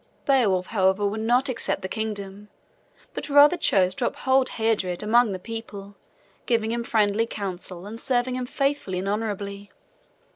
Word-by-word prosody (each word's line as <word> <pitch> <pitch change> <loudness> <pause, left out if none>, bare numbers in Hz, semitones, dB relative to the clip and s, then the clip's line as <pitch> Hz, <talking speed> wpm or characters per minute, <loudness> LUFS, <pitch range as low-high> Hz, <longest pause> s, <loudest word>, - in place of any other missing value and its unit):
Beowulf, 210 -10 +3
however, 190 0 +1
would 210 +2 -2
not 245 +4 +2
accept 230 -6 -2
the - - -2
kingdom, 205 -1 -5 0.6
but - - -5
rather 290 +3 +7
chose 185 - +2
to 240 - -1
uphold 260 0 +1
Heardred 210 -6 -1
among 230 +1 +4
the 190 - -3
people, 205 -1 -8 0.5
giving 225 -2 +1
him 235 0 -2
friendly 220 0 +1
counsel 185 -3 -6
and 220 +3 -7
serving 250 0 0
him 255 -1 -3
faithfully 275 -9 -1
and 190 +2 -3
honorably. 205 -1 -4
215 Hz, 150 wpm, -24 LUFS, 195-240 Hz, 0.6 s, rather